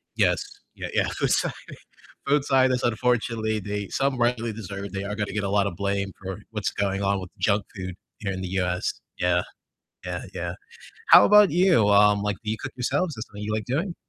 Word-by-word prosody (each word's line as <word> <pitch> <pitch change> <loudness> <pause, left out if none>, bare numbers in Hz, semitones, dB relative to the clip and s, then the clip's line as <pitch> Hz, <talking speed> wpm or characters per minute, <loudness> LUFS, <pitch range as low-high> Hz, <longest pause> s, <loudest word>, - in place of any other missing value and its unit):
Yes. - - +2 0.3
Yeah, - - -5
yeah. - - +2
I'm - - +3
sorry - - +1 0.7
food 145 0 +3
scientists, 130 -2 +3
unfortunately 115 -2 0
they 105 0 -4
some 135 -1 0
rightly 120 -1 +1
deserved, 100 -2 -6
they 95 0 -3
are 105 +1 -3
gonna 105 -1 -3
get 105 0 -1
a - - -1
lotta 100 0 +2
blame 100 +2 -2
for 95 0 -5
what's 105 -2 -2
going 100 -1 -1
on 100 0 +1
with 90 - -8
the - - -33
junk 100 -1 +2
food 90 -2 -6 0.2
here 100 -2 -3
in 95 - -5
the 95 - -4
US, 90 -1 -1 0.2
yeah, 90 0 +2 0.6
yeah, - - -4
yeah. - - -4 0.5
How - - +9
about 210 -1 +7
you, 175 - +4
um, 105 0 +5
like 105 -1 -1
do 105 - -2
you 110 - -2
cook - - -5
yourselves? 160 +7 0
Is 110 - -5
that - - -28
something 105 0 -9
you 105 +1 -2
like 110 -1 -2
doing? 165 +8 -1
105 Hz, 210 wpm, -25 LUFS, 100-120 Hz, 0.7 s, How